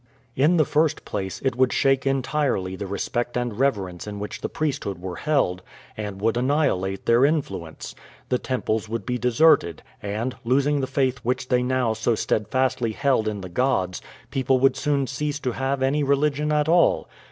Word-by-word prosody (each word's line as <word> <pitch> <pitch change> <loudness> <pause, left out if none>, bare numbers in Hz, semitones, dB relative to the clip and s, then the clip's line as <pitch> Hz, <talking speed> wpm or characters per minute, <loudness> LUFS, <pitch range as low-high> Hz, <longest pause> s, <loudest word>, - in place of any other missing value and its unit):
In 155 +7 +3
the 155 - +4
first 155 +2 +1
place, 95 -2 -4
it 130 -3 +1
would 130 0 +3
shake 135 0 +2
entirely 135 -8 0
the 100 +1 -5
respect 120 +5 -2
and 120 -3 -3
reverence 100 -10 -1
in 105 -1 -5
which 105 +1 -6
the - - -3
priesthood 140 - -2
were 90 -1 -6
held, 135 -13 0 0.3
and 105 -2 -5
would 115 +3 +1
annihilate 120 -8 0
their 115 +2 +4
influence. 100 - -2 0.4
The 125 - +1
temples 110 -4 -2
would 115 -3 -3
be 125 0 -2
deserted, 125 - +3 0.2
and, 110 +5 -3
losing 140 +4 +2
the 130 - -1
faith 130 -2 0
which 125 +1 -2
they 125 -1 +3
now 125 -2 +1
so 110 +1 0
steadfastly 120 +1 0
held 130 -4 +1
in 105 -2 -3
the 95 - -6
gods, 95 -3 0 0.3
people 130 0 +2
would 135 - +4
soon 145 -2 0
cease 145 +2 -3
to 125 - -1
have 135 +2 -1
any 140 +3 +2
religion 145 +1 +1
at 150 0 +2
all. 170 +1 +3
125 Hz, 175 wpm, -24 LUFS, 105-140 Hz, 0.4 s, the